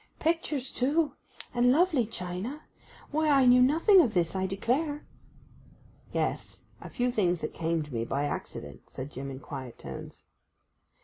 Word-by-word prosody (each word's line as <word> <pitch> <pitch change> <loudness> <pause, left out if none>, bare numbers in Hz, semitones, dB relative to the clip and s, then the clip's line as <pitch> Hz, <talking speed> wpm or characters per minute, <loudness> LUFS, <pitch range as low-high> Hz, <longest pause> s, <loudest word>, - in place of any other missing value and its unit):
'Pictures 310 -5 0
too—and 255 -3 0
lovely 305 - +3
china—why 235 - -5
I 275 -3 +5
knew 250 0 +7
nothing 330 - +6
of 230 - 0
this, 170 0 +1
I 190 0 0
declare.' 275 - -1 1.1
'Yes—a - - -4
few 245 0 0
things 180 -7 +1
that 155 - -3
came 165 -1 -1
to 150 -3 -11
me 115 -1 -1
by 140 +5 -1
accident,' - - -6
said 135 +3 -7
Jim 135 0 -6
in 130 -1 -7
quiet 130 -2 -8
tones. - - -8
240 Hz, 135 wpm, -29 LUFS, -, 1.1 s, knew